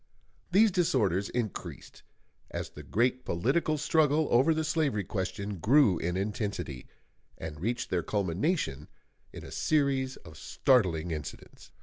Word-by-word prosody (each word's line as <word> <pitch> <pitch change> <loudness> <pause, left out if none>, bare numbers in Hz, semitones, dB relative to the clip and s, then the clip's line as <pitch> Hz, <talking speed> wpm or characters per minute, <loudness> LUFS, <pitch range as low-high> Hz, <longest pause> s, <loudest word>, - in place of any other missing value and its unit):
These 210 +4 +5
disorders 110 - +1
increased 120 -5 -5 0.5
as - - -5
the - - -10
great 125 +4 0
political 135 - 0
struggle 150 0 +2
over 130 +7 +5
the 160 0 +1
slavery 155 -9 0
question 100 0 -4
grew 115 - +4
in 90 +2 -2
intensity, 100 - -3 0.5
and 80 -1 -7
reached 120 +5 -2
their 90 - +1
culmination 95 - -1 0.4
in - - -9
a - - -10
series 135 -3 +1
of 80 -1 -14
startling 90 - +2
incidents. 75 -2 -8
110 Hz, 125 wpm, -29 LUFS, 90-145 Hz, 0.5 s, These